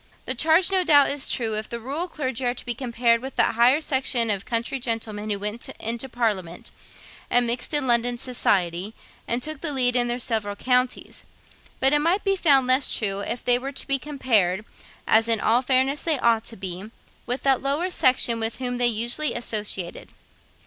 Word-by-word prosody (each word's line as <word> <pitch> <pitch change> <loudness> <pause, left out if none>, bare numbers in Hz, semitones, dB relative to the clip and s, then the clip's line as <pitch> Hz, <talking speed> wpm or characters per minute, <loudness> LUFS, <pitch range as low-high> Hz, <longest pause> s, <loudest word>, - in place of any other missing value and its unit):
The 255 - +1
charge 320 +8 +3
no 375 -1 +3
doubt 290 -5 +5
is 280 -1 -3
true, 225 -3 -1
if 215 0 -5
the 235 - -5
rural 285 +9 -4
clergy 265 -6 -3
are 245 0 0
to - - -9
be 240 - -1
compared 235 -1 0
with 265 +1 -8
that - - +2
higher 240 +5 +4
section 260 -6 +1
of 200 +1 -3
country 235 +3 -1
gentlemen 220 -3 -3
who 205 - -1
went 210 +3 -4
into 235 +4 -3
parliament, 205 -8 -3 0.6
and 245 0 +3
mixed 240 +1 -2
in 295 -3 +2
London 240 0 +1
society, 195 -5 -1 0.3
and 240 +1 0
took 310 -2 -5
the 330 - 0
lead 250 -3 +2
in 240 -1 +2
their 240 0 -2
several 220 -4 -2
counties; 250 +3 -1 0.5
but 270 +2 +3
it 295 - +3
might 340 +7 +1
be 390 -1 +1
found 280 -8 +4
less 255 +2 +2
true 200 -3 -2
if 235 +4 -5
they 245 0 +3
were 270 +2 -6
to 275 - -6
be 275 -1 0
compared, 220 -9 0 0.4
as 225 +1 +3
in 225 -1 +2
all 235 +4 +2
fairness 265 +2 +1
they 320 -3 0
ought 230 -3 +1
to 230 - -10
be, 185 0 -6 0.4
with 250 +2 -3
that 270 -2 +2
lower 295 +7 -1
section 250 -6 +2
with 225 0 -1
whom 245 -1 -4
they 245 - +4
usually 240 +6 +1
associated. 210 -6 -3
245 Hz, 195 wpm, -23 LUFS, 225-270 Hz, 0.6 s, doubt